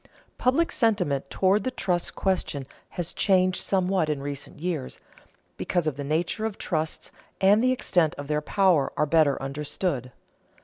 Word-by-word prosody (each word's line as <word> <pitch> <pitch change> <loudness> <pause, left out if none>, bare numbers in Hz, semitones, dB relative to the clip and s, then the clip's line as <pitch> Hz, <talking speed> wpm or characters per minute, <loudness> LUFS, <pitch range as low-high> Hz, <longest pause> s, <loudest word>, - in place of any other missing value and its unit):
Public 275 +7 +2
sentiment 180 - 0
toward 195 +2 +2
the - - 0
trust 180 -8 -2
question 180 -8 -1 0.3
has 175 -2 -2
changed 185 -2 +2
somewhat 185 -4 +1
in 150 -2 -1
recent 140 0 -6
years, 165 -5 -3 0.6
because 175 -1 0
the 145 -2 -2
nature 165 +8 -1
of 210 - -7
trusts 160 -2 -3 0.3
and 205 +4 +5
the 255 - +4
extent 175 -10 +1
of 145 - -7
their 150 +1 -1
power 180 -4 +2
are 150 - +3
better 150 -2 +3
understood. 140 -1 -3
175 Hz, 145 wpm, -26 LUFS, 145-195 Hz, 0.6 s, and